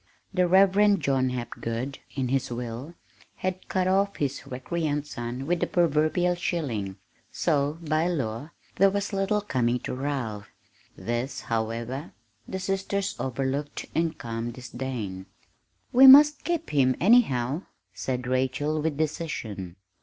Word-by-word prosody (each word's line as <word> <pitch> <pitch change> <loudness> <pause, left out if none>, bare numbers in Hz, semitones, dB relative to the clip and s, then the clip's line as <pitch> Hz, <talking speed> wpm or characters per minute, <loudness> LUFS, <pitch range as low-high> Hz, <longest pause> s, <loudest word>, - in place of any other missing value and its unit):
The 180 -1 +3
Reverend 195 +2 +5
John 130 -2 +1
Hapgood, 125 +1 -4 0.2
in 130 -3 -1
his 135 +1 0
will, 120 +6 -6 0.4
had 185 0 -4
cut 185 -1 +1
off 200 +1 +2
his 140 -2 -3
recreant 145 +3 -2
son 125 -1 -5
with 175 +3 0
the - - 0
proverbial 170 +1 +2
shilling, 130 - -2 0.4
so, 145 +1 0
by 155 +1 +1
law, 135 -5 -2 0.3
there 195 +1 +6
was 200 +1 -2
little 195 +2 +1
coming 125 - 0
to - - -4
Ralph. 125 -7 -3 0.5
This, 120 +3 -3
however, 115 +6 -3 0.3
the 190 - -4
sisters 195 +1 -2
overlooked 135 +3 -2
in 165 -1 +1
calm 115 -3 -4
disdain. 120 -6 -6 0.7
"We 265 +2 +9
must 295 +3 +9
keep 340 -2 -2
him, 130 -3 +3
anyhow," 155 - +3 0.3
said 125 -2 -3
Rachel 130 +4 0
with 155 -2 -1
decision. 120 - -3
140 Hz, 130 wpm, -26 LUFS, 125-180 Hz, 0.7 s, We